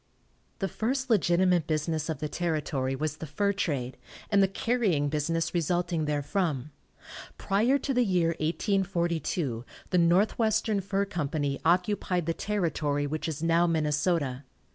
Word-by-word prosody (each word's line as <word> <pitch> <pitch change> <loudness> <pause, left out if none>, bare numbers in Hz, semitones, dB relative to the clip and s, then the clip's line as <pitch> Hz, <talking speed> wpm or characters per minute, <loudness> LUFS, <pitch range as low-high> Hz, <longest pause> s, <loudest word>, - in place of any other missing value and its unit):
The 195 - -1
first 255 +5 -2
legitimate 180 -4 +3
business 155 0 -1
of 160 - -2
the 150 +2 -3
territory 150 -5 -1
was 150 +1 -3
the 160 - -7
fur 200 +8 0
trade, 140 -10 -2 0.3
and 200 -1 +5
the 195 - +5
carrying 195 -8 0
business 160 +3 -1
resulting 175 -1 0
therefrom. 150 -1 -1 0.7
Prior 225 +8 +2
to 275 0 -2
the 250 -1 +3
year 180 -6 +2
1842 170 - -1 0.3
the 180 - +4
Northwestern 205 +4 +2
Fur 195 +1 -1
Company 145 -6 -2
occupied 180 0 +1
the 165 - 0
territory 160 -8 -1
which 155 +3 -3
is 155 -1 -4
now 165 +1 +3
Minnesota. 150 -3 0
170 Hz, 135 wpm, -28 LUFS, 150-195 Hz, 0.7 s, and